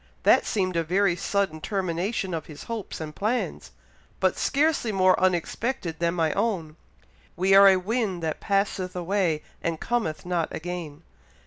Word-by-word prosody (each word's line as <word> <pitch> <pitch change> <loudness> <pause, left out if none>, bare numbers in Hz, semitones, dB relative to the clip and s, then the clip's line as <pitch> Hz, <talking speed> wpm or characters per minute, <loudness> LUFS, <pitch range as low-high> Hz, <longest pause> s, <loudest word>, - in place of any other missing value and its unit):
That - - +5
seemed 185 -4 0
a 165 - +2
very 180 +2 +2
sudden 180 -3 -1
termination 190 +1 -2
of 160 -2 -4
his 150 -2 -10
hopes 230 -3 -5
and 155 -1 -6
plans, 225 +5 -2 0.5
but - - +2
scarcely 290 -5 +1
more 185 -2 +4
unexpected 185 0 -1
than 170 0 +1
my 160 -3 +1
own. 170 -9 -1 0.6
'We 190 +2 +2
are 195 0 +9
a 190 -1 +6
wind 195 -2 -2
that 160 -1 -2
passeth 195 -2 -1
away 180 -3 0 0.2
and 165 -1 -2
cometh 225 -12 -2
not 175 -2 0
again.' 170 -2 -6
185 Hz, 150 wpm, -26 LUFS, 165-200 Hz, 0.6 s, are